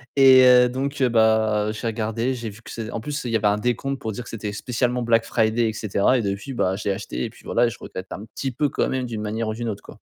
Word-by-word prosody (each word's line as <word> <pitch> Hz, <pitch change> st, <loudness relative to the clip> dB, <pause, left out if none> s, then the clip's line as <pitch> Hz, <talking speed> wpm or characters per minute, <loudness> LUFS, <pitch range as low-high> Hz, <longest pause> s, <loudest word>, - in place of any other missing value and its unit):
et, 130 Hz, -1 st, +8 dB
heu, 125 Hz, -1 st, +7 dB
donc 135 Hz, +2 st, -2 dB
bah, 110 Hz, -3 st, +3 dB
j'ai 110 Hz, +2 st, -4 dB
regardé, 115 Hz, +3 st, -1 dB
j'ai 120 Hz, -3 st, -5 dB
vu 105 Hz, +2 st, -13 dB
que -, -, -11 dB
c'est 110 Hz, -1 st, -5 dB
en 115 Hz, -, -4 dB
plus 150 Hz, +4 st, -4 dB
il 120 Hz, -, -2 dB
y -, -, +1 dB
avait 105 Hz, -2 st, +2 dB
un 105 Hz, 0 st, +2 dB
décompte 125 Hz, +4 st, -2 dB
pour 110 Hz, -, -4 dB
dire 120 Hz, -, -6 dB
que -, -, -12 dB
c'était 105 Hz, -2 st, -5 dB
spécialement 125 Hz, +3 st, -1 dB
Black 115 Hz, -1 st, +2 dB
Friday 115 Hz, +1 st, +1 dB
et -, -, -4 dB
cetera 110 Hz, +3 st, +1 dB
et 120 Hz, -, 0 dB
depuis, 100 Hz, +6 st, -4 dB
bah, 95 Hz, -5 st, 0 dB
je 105 Hz, -, -8 dB
l'ai 100 Hz, -, +1 dB
acheté -, -, -4 dB
et -, -, -4 dB
puis -, -, -18 dB
voilà -, -, +2 dB
et -, -, 0 dB
je 120 Hz, -, -9 dB
regrette 95 Hz, +1 st, -8 dB
un 100 Hz, -, -6 dB
petit 135 Hz, -, -3 dB
peu 145 Hz, +4 st, 0 dB
quand -, -, 0 dB
même 130 Hz, -1 st, -1 dB
d'une 110 Hz, -3 st, -5 dB
manière 110 Hz, +1 st, -2 dB
ou 110 Hz, -, -2 dB
d'une 120 Hz, +1 st, -4 dB
autre 100 Hz, -, -6 dB
quoi. -, -, -13 dB
115 Hz, 290 wpm, -23 LUFS, 110-125 Hz, -, et